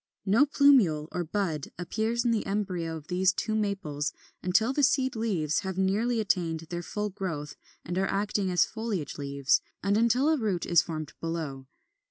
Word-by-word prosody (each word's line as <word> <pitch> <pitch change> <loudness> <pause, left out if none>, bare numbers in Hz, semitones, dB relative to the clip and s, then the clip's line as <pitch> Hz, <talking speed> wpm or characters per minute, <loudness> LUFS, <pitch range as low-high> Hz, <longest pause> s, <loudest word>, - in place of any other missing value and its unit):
No 225 +9 +4
plumule 250 - +4
or 175 - -2
bud 165 -4 -2
appears 220 +7 -1
in 240 - +3
the 225 -2 +1
embryo 180 -5 -2
of 150 - -11
these 185 +2 +2
two 215 +3 -2
Maples 195 -9 -1 0.3
until 220 +8 +2
the 290 - +1
seed 260 -2 +2
leaves 185 -9 0
have 190 -1 -4
nearly 215 +5 +1
attained 175 -6 0
their 175 0 -2
full 210 +4 -3
growth 165 -7 -4 0.3
and 175 - -4
are 195 - +1
acting 200 -1 0
as 180 -1 +4
foliage 215 -11 -4
leaves, 140 -1 +1 0.2
and 200 +2 +2
until 240 +6 +3
a 315 - +3
root 200 -7 -1
is 170 -2 +5
formed 155 -3 -6
below. 155 -5 -4
190 Hz, 175 wpm, -28 LUFS, 165-220 Hz, 0.3 s, is